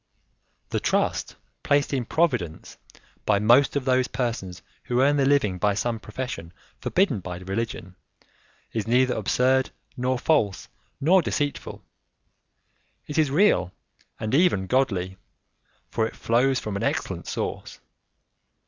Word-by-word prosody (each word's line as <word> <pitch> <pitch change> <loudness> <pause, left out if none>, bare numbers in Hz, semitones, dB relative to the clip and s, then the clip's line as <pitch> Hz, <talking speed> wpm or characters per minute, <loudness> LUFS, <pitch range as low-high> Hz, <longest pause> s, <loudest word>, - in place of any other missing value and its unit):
The - - -1
trust - - 0 0.3
placed 145 0 +1
in 130 -3 0
Providence 125 - -1 0.5
by 105 - +3
most 120 +8 +4
of 140 -2 -1
those 130 -1 +2
persons 105 -8 -4 0.2
who 125 0 0
earn 145 +2 +4
their 135 -1 +3
living 105 -10 +2
by 105 0 +2
some 115 +1 -1
profession 105 -7 -6 0.3
forbidden 175 - +1
by 90 -1 -6
religion 95 0 -4 0.8
is 110 -1 -2
neither 125 +2 +3
absurd, 130 +5 +2 0.3
nor 130 0 0
false, 120 -8 +1 0.3
nor 180 +6 +5
deceitful; 145 -2 -3 1.2
it 150 +1 -2
is 155 -3 +3
real 145 - +3 0.5
and 110 +1 -3
even 145 - +3
godly, 95 -5 0 0.7
for 110 -1 +1
it - - -11
flows 125 +3 +2
from 105 -2 -5
an 100 - -3
excellent - - -2
source. - - -4
125 Hz, 130 wpm, -25 LUFS, 100-135 Hz, 1.2 s, nor